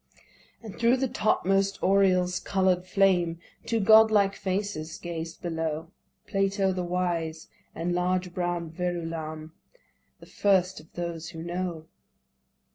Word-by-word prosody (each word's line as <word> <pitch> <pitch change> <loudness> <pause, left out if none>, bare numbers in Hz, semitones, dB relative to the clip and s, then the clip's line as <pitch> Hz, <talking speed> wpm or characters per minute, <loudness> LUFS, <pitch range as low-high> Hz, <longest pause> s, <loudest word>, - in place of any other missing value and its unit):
And 215 -4 -9
thro' 235 +2 +4
the 265 +1 0
topmost 195 -3 +1
Oriels, 185 -2 +3
coloured 185 -2 +1
flame 180 -3 +2 0.3
Two 230 - +1
godlike 220 -1 +6
faces 190 -5 -3
gazed 165 -1 -6
below; 165 -1 -3 0.3
Plato 195 -1 +1
the 180 -1 -2
wise, 175 -3 -2 0.3
and 170 +2 -2
large 180 0 0
brow'd 175 -2 -2
Verulam, 165 -3 -4 0.7
The - - -13
first 190 -2 +1
of 155 - -17
those 170 -2 -5
who 165 -2 -8
know. 175 -2 -4
180 Hz, 120 wpm, -27 LUFS, 165-195 Hz, 0.7 s, godlike